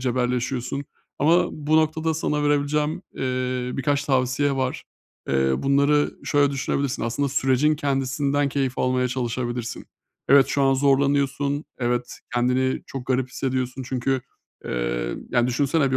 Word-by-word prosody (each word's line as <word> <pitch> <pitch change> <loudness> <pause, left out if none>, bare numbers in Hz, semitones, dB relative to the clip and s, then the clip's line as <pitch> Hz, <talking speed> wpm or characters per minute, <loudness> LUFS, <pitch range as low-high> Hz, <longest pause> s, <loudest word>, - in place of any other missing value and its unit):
cebelleşiyorsun 125 +2 -1 0.3
ama 170 +5 +4
bu 155 +1 +1
noktada 160 +1 +1
sana 150 -1 -1
verebileceğim, 145 +3 +1
eee, 125 -1 -2
birkaç 140 +1 0
tavsiye 135 +1 +1
var. 130 -1 -2 0.4
Eee, 65 0 +2
bunları 140 +2 +2
şöyle 145 -1 +3
düşünebilirsin, 140 0 -1
aslında 140 +5 0
sürecin 135 +2 +2
kendisinden 140 0 0
keyif 135 -2 -1
almaya 130 0 +1
çalışabilirsin. 120 -1 -3 0.4
Evet, 135 -1 +7
şu 140 0 0
an 135 0 +4
zorlanıyorsun. 140 +1 +1
Evet, 120 0 -2 0.2
kendini 125 +2 +1
çok 135 -2 -7
garip 130 0 0
hissediyorsun. 130 0 -2
Çünkü, 130 +1 0 0.4
eee, - - -2 0.2
ya, 120 -1 +3
düşünsene 140 +3 +1
bir 130 - +2
135 Hz, 130 wpm, -24 LUFS, 125-145 Hz, 0.4 s, Evet